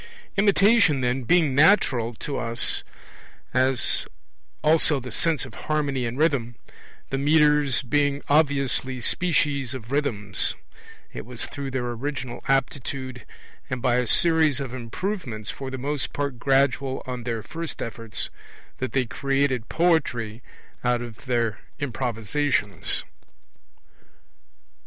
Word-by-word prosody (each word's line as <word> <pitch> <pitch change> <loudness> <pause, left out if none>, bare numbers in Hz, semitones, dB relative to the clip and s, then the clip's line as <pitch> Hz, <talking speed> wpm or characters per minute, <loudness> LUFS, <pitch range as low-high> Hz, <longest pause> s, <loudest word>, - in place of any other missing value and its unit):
Imitation, 200 - +4
then, 125 +1 0
being 165 -2 +3
natural 130 - +4
to 140 +5 -5
us 115 -1 +1 0.7
as 130 0 +2 0.6
also 155 -2 +4
the 125 -1 -8
sense 160 +3 +2
of 130 - -12
harmony 140 -2 -1
and 120 +2 -5
rhythm, 140 -7 +1 0.6
the 135 - -1
metres 150 -2 +4
being 145 +2 +1
obviously 140 -3 +2
species 140 -3 +1
of 120 -1 -9
rhythms 110 -9 0 0.6
it - - -6
was 120 +1 -3
through 140 -1 -6
their 130 -2 -2
original 125 0 -5
aptitude, 135 -1 -2 0.4
and 130 - -2
by 125 0 +2
a 125 -1 0
series 160 -1 +4
of 135 -3 -5
improvements 125 - -3
for 135 -1 -7
the 130 - -5
most 140 +1 -2
part 140 -4 -3
gradual 135 0 +1
on 125 -1 -5
their 115 -2 -3
first 165 0 -6
efforts, 115 -1 -4 0.5
that 130 - -3
they 130 -2 +2
created 135 0 -1
poetry 125 -10 +1 0.4
out 120 -1 +1
of 115 0 -10
their 115 -4 0 0.2
improvisations. 125 - -1
130 Hz, 120 wpm, -24 LUFS, 120-145 Hz, 0.7 s, Imitation